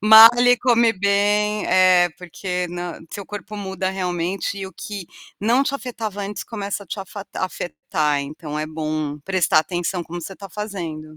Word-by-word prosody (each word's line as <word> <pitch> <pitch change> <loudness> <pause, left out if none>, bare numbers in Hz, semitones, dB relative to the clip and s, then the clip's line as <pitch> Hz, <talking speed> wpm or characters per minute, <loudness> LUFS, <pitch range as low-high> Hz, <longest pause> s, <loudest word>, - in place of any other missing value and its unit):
Malhe, 230 +3 +9
come 235 -2 +4
bem 205 +2 +2
é, 185 -1 +5
porque 180 0 -4
nã 175 -1 -5
seu 200 - -6
corpo 210 +1 -7
muda 190 -1 -2
realmente 180 +1 -2
e 195 - -4
o 190 - -11
que 195 0 -7 0.3
não 235 +6 +3
te 275 - -1
afetava 220 -6 -4
antes 200 +1 -4
começa 205 -2 -4
a - - -25
te 185 - -5
afatar 195 0 -7
afetar, 155 -5 -1
então 150 +1 -6
é 155 - -2
bom 155 -1 -3
prestar 185 -4 +3
atenção 175 +3 -1
como 175 +1 -7
você 195 - -6
está 195 +1 -10
fazendo. 170 -7 -6
190 Hz, 165 wpm, -22 LUFS, 175-210 Hz, 0.3 s, Malhe